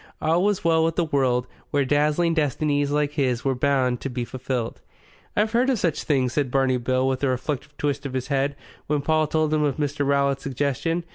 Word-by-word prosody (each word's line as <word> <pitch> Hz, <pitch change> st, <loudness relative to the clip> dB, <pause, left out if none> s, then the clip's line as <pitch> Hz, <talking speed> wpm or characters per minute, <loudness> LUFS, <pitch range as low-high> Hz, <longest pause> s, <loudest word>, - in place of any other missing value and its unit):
All 165 Hz, +3 st, +2 dB
was 205 Hz, -1 st, +1 dB
well 165 Hz, -1 st, +3 dB
with 165 Hz, 0 st, 0 dB
the 175 Hz, -, +1 dB
world 130 Hz, -4 st, +1 dB, 0.2 s
where 140 Hz, -1 st, +1 dB
dazzling 150 Hz, +4 st, +2 dB
destinies 145 Hz, -1 st, +1 dB
like 145 Hz, 0 st, +1 dB
his 130 Hz, -5 st, -1 dB
were 135 Hz, -, +2 dB
bound 130 Hz, -1 st, +1 dB
to 135 Hz, -, -3 dB
be 125 Hz, -1 st, -3 dB
fulfilled. 125 Hz, -2 st, -4 dB, 0.6 s
"I've 215 Hz, +1 st, +2 dB
heard 245 Hz, +3 st, +2 dB
of 260 Hz, -, +2 dB
such 170 Hz, -6 st, 0 dB
things," 130 Hz, -4 st, +1 dB
said 145 Hz, -3 st, 0 dB
Barney 130 Hz, 0 st, +2 dB
Bill 130 Hz, +1 st, 0 dB
with 130 Hz, +1 st, -1 dB
a -, -, +3 dB
reflective 130 Hz, +3 st, -3 dB
twist 145 Hz, -1 st, -1 dB
of 130 Hz, -, -8 dB
his 130 Hz, -1 st, -2 dB
head, 140 Hz, 0 st, 0 dB, 0.3 s
when 150 Hz, -1 st, 0 dB
Paul 155 Hz, +1 st, +2 dB
had -, -, -8 dB
told 155 Hz, -1 st, +1 dB
him 155 Hz, -, +2 dB
of 145 Hz, -3 st, 0 dB
Mr. 145 Hz, -1 st, -1 dB
Rowlatt's 140 Hz, -1 st, +1 dB
suggestion. 140 Hz, +5 st, -1 dB
140 Hz, 215 wpm, -24 LUFS, 130-155 Hz, 0.6 s, well